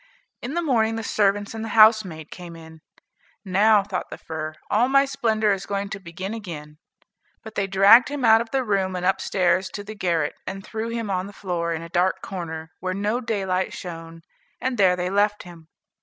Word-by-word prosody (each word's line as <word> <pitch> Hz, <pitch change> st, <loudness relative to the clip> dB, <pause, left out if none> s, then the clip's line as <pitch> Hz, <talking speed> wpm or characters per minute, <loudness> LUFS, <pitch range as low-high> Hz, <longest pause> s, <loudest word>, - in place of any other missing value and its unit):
In 260 Hz, +6 st, -5 dB
the 345 Hz, -, 0 dB
morning 225 Hz, -7 st, +2 dB
the 225 Hz, -, -4 dB
servants 205 Hz, -1 st, +1 dB
and 225 Hz, 0 st, -5 dB
the 225 Hz, -, -5 dB
housemaid 215 Hz, -8 st, +5 dB
came 175 Hz, -2 st, -9 dB
in. 160 Hz, -1 st, -13 dB, 0.6 s
"Now," 205 Hz, +2 st, +4 dB
thought 190 Hz, -2 st, -4 dB
the -, -, -7 dB
fir, 155 Hz, -1 st, -6 dB
"all 235 Hz, +5 st, +2 dB
my 275 Hz, +1 st, +5 dB
splendor 220 Hz, -5 st, +1 dB
is 195 Hz, 0 st, -5 dB
going 200 Hz, 0 st, -2 dB
to 195 Hz, -, -6 dB
begin 185 Hz, +3 st, -6 dB
again." 155 Hz, -8 st, -8 dB, 0.6 s
But 220 Hz, -, -10 dB
they 200 Hz, -2 st, -1 dB
dragged 195 Hz, +6 st, +6 dB
him 290 Hz, -3 st, -2 dB
out 225 Hz, 0 st, +6 dB
of 235 Hz, -, -6 dB
the 265 Hz, +1 st, 0 dB
room 195 Hz, -4 st, 0 dB
and 180 Hz, 0 st, -3 dB
up 190 Hz, -, +2 dB
stairs 185 Hz, 0 st, +1 dB
to 205 Hz, -, -5 dB
the 215 Hz, +2 st, -8 dB
garret, 170 Hz, -7 st, 0 dB
and 195 Hz, +1 st, -6 dB
threw 225 Hz, +1 st, -4 dB
him 230 Hz, -3 st, -3 dB
on 185 Hz, 0 st, -1 dB
the 205 Hz, -, -11 dB
floor, 175 Hz, -4 st, -3 dB
in 165 Hz, 0 st, -3 dB
a -, -, -8 dB
dark 180 Hz, +2 st, +1 dB
corner, 160 Hz, -4 st, -6 dB
where 185 Hz, 0 st, -3 dB
no 210 Hz, +4 st, 0 dB
daylight 190 Hz, -5 st, -1 dB
shone, 165 Hz, -2 st, -8 dB, 0.4 s
and 255 Hz, -3 st, -2 dB
there 185 Hz, -2 st, +5 dB
they 180 Hz, +1 st, -2 dB
left 205 Hz, +1 st, +1 dB
him. 170 Hz, -3 st, -13 dB
195 Hz, 205 wpm, -23 LUFS, 175-220 Hz, 0.6 s, dragged